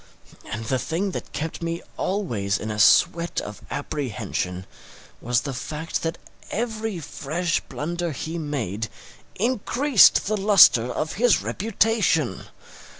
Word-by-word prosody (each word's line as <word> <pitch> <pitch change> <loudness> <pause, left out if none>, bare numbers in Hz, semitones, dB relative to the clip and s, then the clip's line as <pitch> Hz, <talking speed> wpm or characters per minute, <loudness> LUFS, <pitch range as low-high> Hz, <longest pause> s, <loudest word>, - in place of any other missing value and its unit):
And 110 0 -4
the 130 +3 0
thing 185 +8 -2
that - - -6
kept 160 +2 -4
me 170 0 -3
always 115 - -1
in 110 - -5
a 105 - -4
sweat 170 +10 +4
of 105 - -8
apprehension 110 - -3 0.6
was 120 0 +1
the 135 - -5
fact 150 +6 -4
that 165 +1 -2 0.3
every 220 -3 -3
fresh 165 +2 -2
blunder 170 +2 -4
he 160 +3 -5
made 115 - -3 0.5
increased 245 +3 +4
the 215 +1 0
lustre 195 - +6
of 155 - -3
his 235 0 +3
reputation! 200 - +1
165 Hz, 125 wpm, -24 LUFS, 120-195 Hz, 0.6 s, lustre